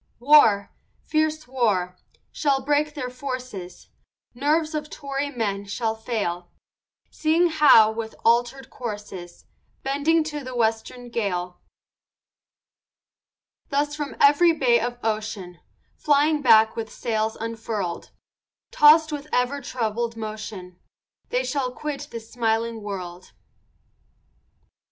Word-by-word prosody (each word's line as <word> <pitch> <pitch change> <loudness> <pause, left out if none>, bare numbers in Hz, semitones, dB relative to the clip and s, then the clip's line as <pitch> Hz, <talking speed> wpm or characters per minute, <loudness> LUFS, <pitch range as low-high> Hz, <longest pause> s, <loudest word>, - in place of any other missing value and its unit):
War, 235 -7 +5 0.3
fierce 310 -1 -1
war, 205 -8 0 0.4
shall 280 -3 +1
break 295 +1 +1
their 255 -4 -4
forces, 250 -8 -7 0.4
Nerves 305 +5 0
of 300 0 -4
Tory 280 -1 -4
men 205 -6 -3
shall 220 +3 -2
fail, 210 -6 -3 0.6
Seeing 330 +3 +2
Howe, 275 -9 +6
with 220 0 -6
alter'd 245 +3 +1
courses, 205 -7 -8 0.4
Bending 290 +4 +2
to 300 -2 -5
the 255 -1 -7
western 235 +2 -1
gale. 180 -6 -3 2.1
Thus 290 +1 0
from 295 -2 -5
every 295 +4 +5
bay 245 -6 +3
of 240 +1 -3
ocean, 215 -5 -3 0.4
Flying 295 +1 +2
back 220 -4 +5
with 225 -1 -5
sails 220 -1 -2
unfurl'd, 225 -5 -4 0.6
Tossed 310 +1 +6
with 295 0 -5
ever 250 +3 0
troubled 230 -2 -3
motion, 215 -5 -7 0.5
They - - 0
shall 270 - -2
quit 290 +1 -5
this 230 -3 -9
smiling 225 -1 -1
world. 185 -3 -7
240 Hz, 110 wpm, -24 LUFS, 220-290 Hz, 2.1 s, Howe